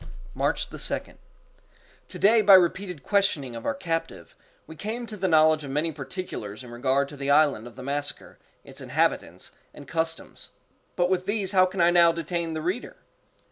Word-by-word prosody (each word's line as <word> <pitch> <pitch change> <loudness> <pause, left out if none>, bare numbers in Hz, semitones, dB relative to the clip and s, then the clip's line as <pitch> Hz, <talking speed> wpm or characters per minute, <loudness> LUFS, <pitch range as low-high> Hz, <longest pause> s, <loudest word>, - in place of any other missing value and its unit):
March - - -1
2d. - - -3 0.9
To - - -9
day 220 +3 +5
by 200 -2 +8
repeated 180 -3 +1
questioning 170 - 0
of 115 - -6
our 285 - 0
captive, 165 -10 -4 0.3
we 160 - -11
came 220 +7 -5
to 220 - -8
the 190 -2 -1
knowledge 155 -2 +4
of 140 - -7
many 150 +4 -1
particulars 135 - -7
in 120 - -11
regard 130 +3 0
to 145 - -11
the 140 0 -4
island 140 -6 +3
of 120 - -13
the 130 - -9
massacre, 145 +1 -4 0.2
its - - -12
inhabitants, - - -1 0.2
and 145 - -12
customs—but 165 +2 -4
with 185 0 -1
these 200 -2 0
how 185 -2 +5
can 185 0 -3
I 170 +1 +5
now 170 -1 +6
detain 165 0 -3
the 155 -1 -4
reader? 185 +9 -3
165 Hz, 175 wpm, -26 LUFS, 140-185 Hz, 0.9 s, by